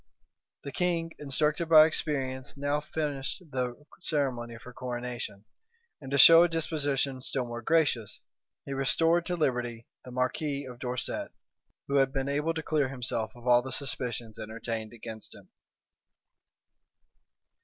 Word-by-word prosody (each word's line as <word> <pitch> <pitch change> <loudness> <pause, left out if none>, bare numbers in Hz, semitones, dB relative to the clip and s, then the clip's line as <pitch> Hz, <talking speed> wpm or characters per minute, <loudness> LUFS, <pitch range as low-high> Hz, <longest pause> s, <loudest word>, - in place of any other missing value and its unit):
The 140 - -5
king, 170 -1 0
instructed 150 +3 0
by 155 -1 +9
experience, 135 -4 -2
now 145 +1 0
finished 150 0 -3
the 125 +2 -3
ceremony 130 -8 -1
of 115 - -13
her 125 - -11
coronation; 120 -5 -5 0.6
and 135 - -8
to 140 - +1
show 165 +5 +10
a 175 - +6
disposition 145 -5 -1
still 130 0 -1
more 120 0 -6
gracious, 135 -7 +1 0.5
he 140 - -4
restored 165 +5 +2
to 180 - 0
liberty 120 -7 -1 0.2
the - - -10
marquis 140 +3 -1
of 125 -2 -10
Dorset, 125 0 -3 0.6
who 140 - +1
had 135 -1 +4
been 135 0 -2
able 150 +3 0
to 160 - -3
clear 150 -4 +1
himself 120 -4 -2
of 120 0 -14
all 120 -1 +6
the 130 +1 -7
suspicions 120 -5 -2
entertained 110 0 -5
against 110 -2 -8
him. - - -16
135 Hz, 145 wpm, -29 LUFS, 120-150 Hz, 0.6 s, show